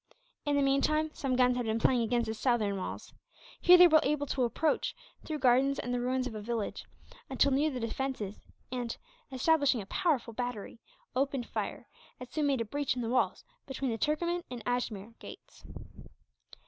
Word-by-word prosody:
In 290 - +2
the 285 - +3
meantime, 305 +3 +2
some 265 -3 -1
guns 250 0 +4
had 245 -2 -2
been 220 0 +1
playing 240 +2 +3
against 235 +1 +1
the 220 - -3
southern 220 -3 +1
walls. 190 - -6 0.5
Here 360 0 +8
they 355 0 +9
were 315 -2 +6
able 300 -2 0
to 260 -2 0
approach, 300 +6 0 0.3
through 310 - -3
gardens 265 +1 +3
and 245 - -3
the 245 - 0
ruins 255 +1 0
of 255 - -5
a 215 - -6
village, 225 -1 -3 0.4
until 270 +1 +3
near 285 +4 +2
the 260 -4 -4
defences 230 -3 -4 0.3
and, 245 -2 -3 0.3
establishing 285 -1 +3
a 200 - -6
powerful 250 - 0
battery, 245 -2 -5 0.4
opened 270 -1 0
fire, - - -5 0.3
and 250 - -8
soon 300 -2 0
made 270 -4 +1
a - - -1
breach 285 +3 -1
in 245 - -3
the 225 - -2
walls 255 - +1 0.2
between 265 -1 -2
the 225 - -2
Turkoman 340 +6 0
and 245 -3 -7
Ajmere 230 -3 -2
gates. - - -13
255 Hz, 185 wpm, -31 LUFS, 235-285 Hz, 0.5 s, they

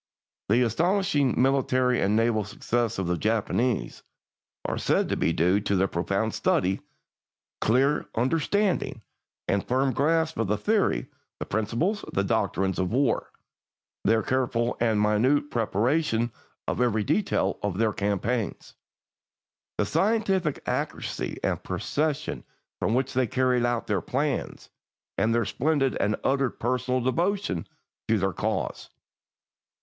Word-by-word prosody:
The 120 +4 +4
astonishing 150 - +1
military 130 -1 +2
and 100 +2 +2
naval 115 -1 +2
successes 115 +3 -2
of 95 - -1
the 85 -1 -1
Japanese 115 +4 0 0.6
are - - -2
said - - +1
to - - +1
be - - +1
due 90 +5 +2
to 100 -1 -1
their 95 +1 +3
profound 100 +5 -1
study, 95 +2 +1 0.8
clear 135 +6 +2
understanding, 165 - 0 0.4
and 100 -1 +1
firm 130 +1 +1
grasp 160 +4 +1
of 115 - +1
the 105 +2 +1
theory, 205 - +1 0.3
the - - -5
principles, 120 - -1
the 100 - +1
doctrines 95 0 0
of 90 0 0
war; 130 0 +1 0.7
their 110 +1 +3
careful 120 -2 0
and 115 -3 +2
minute 115 +8 +2
preparation 120 +2 +1 0.4
of - - -1
every 110 -4 +2
detail 185 - 0
of 100 -3 -2
their 110 -1 +2
campaigns; 105 +2 -2 1.0
the - - +1
scientific 195 -7 +1
accuracy - - -3
and - - 0
precision 155 0 -2 0.4
with 110 - +1
which 130 +1 0
they 130 -1 +2
carry 125 +1 +1
out 120 -1 0
all - - -28
their 100 -4 0
plans, 140 - -2 0.5
and 110 - +2
their 115 -1 +2
splendid 135 +5 +1
and 105 +1 +1
utter 135 -1 +2
personal 125 +2 -1
devotion 165 - 0 0.4
to 110 - +3
their 95 -1 0
cause. 110 -2 -3
120 Hz, 135 wpm, -26 LUFS, 105-140 Hz, 1.0 s, The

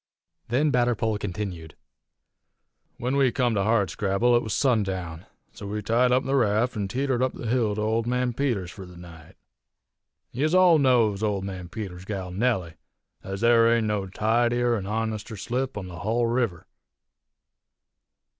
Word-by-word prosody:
Then 140 +5 +1
Batterpole 120 -4 +1
continued: 90 -6 -5 1.2
"When 125 +3 -2
we 135 -3 +3
come 125 -3 +1
to 100 - +1
Hardscrabble 105 +2 +1
it 120 - +3
was 110 - -5
sundown, 95 - -1 0.3
so 100 - -9
we 105 +1 -4
tied 120 +4 +2
up 130 +1 +3
the 135 - -2
raft 115 0 +1
an' 100 -2 -2
teetered 130 +3 -1
up 130 0 +1
the - - -8
hill 115 -3 +1
to 105 - -2
Old 110 +2 0
Man 125 0 0
Peters's 115 -9 -1
fur 95 - -10
the 90 -1 -13
night. 85 -3 -13 1.0
Yez 155 +7 0
all 180 -3 +6
knows 115 -7 +3
Old 105 -3 -1
Man 95 -3 -6
Peters's 95 -3 -7
gal 95 -3 -5
Nellie, 95 -5 -1 0.5
ez 95 +1 -6
there 115 -1 +5
ain't 115 -1 +2
no 105 -2 -1
tidier 120 +4 +1
an 100 -3 -4
honester 110 0 -3
slip 125 +4 -3
on 100 - -5
the 85 -2 -9
hull 115 +6 0
river. 115 -8 -1
110 Hz, 160 wpm, -25 LUFS, 95-120 Hz, 1.2 s, all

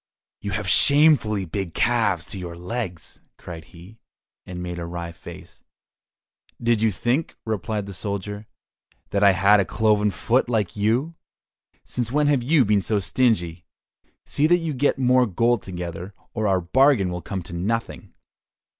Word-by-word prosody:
"You 100 - -5
have 105 0 -3
shamefully 140 - +4
big 90 0 -5
calves 110 -8 +1
to 100 - -6
your 85 -2 -7
legs!" 90 -2 -6 0.2
cried 80 -2 -9
he, 90 +7 -15 0.5
and 90 -1 -7
made 90 -1 -5
a 85 - -4
wry 85 0 -5
face. 85 0 -13 1.0
"Did 115 -2 +1
you 110 - +4
think," 120 - -1
replied 110 -1 -2
the 100 - -8
soldier, 100 +2 -5 0.6
"that 100 0 +1
I 100 -1 +7
had 100 +2 +5
a - - +3
cloven 105 +1 +2
foot 120 +5 0
like 110 -6 -1
you? 115 +10 0 0.7
Since 120 -2 -4
when 150 +2 +2
have 145 -3 +2
you 135 +1 +3
been 105 -1 +2
so 105 +2 0
stingy? 90 -6 0 0.6
See 150 - +1
that 175 +2 +5
you 165 -3 -3
get 140 +2 +1
more 125 -1 +3
gold 115 +3 +1
together, 90 +1 -7 0.2
or 110 -2 -1
our 95 -2 +2
bargain 115 0 +3
will 90 0 -4
come 95 -1 -5
to 85 - -11
nothing!" 110 +7 -3
105 Hz, 160 wpm, -23 LUFS, 90-120 Hz, 1.0 s, I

